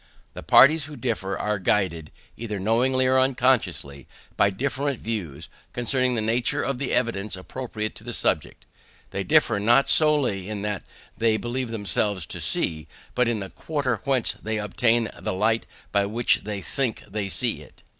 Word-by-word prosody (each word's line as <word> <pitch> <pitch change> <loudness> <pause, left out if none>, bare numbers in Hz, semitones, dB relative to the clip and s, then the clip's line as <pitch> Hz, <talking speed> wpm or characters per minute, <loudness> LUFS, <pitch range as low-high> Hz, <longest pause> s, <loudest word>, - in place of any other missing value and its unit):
The - - -8
parties 150 +2 +6
who 150 -1 -9
differ 110 -6 -2
are 105 -1 -1
guided, 90 -5 0 0.2
either 110 -3 -5
knowingly 125 +6 +2
or 130 0 +4
unconsciously, 125 - +1 0.3
by 100 - +4
different 135 +5 -2
views 85 -9 -5 0.3
concerning 125 +1 +1
the 110 - 0
nature 115 +2 0
of 135 -1 -2
the 140 - -2
evidence 105 -5 0
appropriate 110 +2 -5
to - - -11
the - - -5
subject. - - -1 0.5
They 100 0 -2
differ 120 -5 +3
not 120 +6 +4
solely 135 -11 +3
in 105 -1 -4
what 105 -2 -2 0.3
they 110 -1 +2
believe 120 +3 -3
themselves 100 -4 -1
to - - -6
see, 80 -1 0 0.3
but 125 -1 +2
in 115 -3 -1
the 95 - -7
quarter 140 -7 -2
whence 135 -3 +2
they 110 0 -2
obtained 115 +2 +1
the - - -2
light 110 +4 +1 0.2
by 100 -1 +2
which 115 +3 +1
they 105 -2 -4
think 130 -1 -2
they 105 -2 -3
see - - +1
it. - - -17
115 Hz, 165 wpm, -24 LUFS, 100-130 Hz, 0.5 s, parties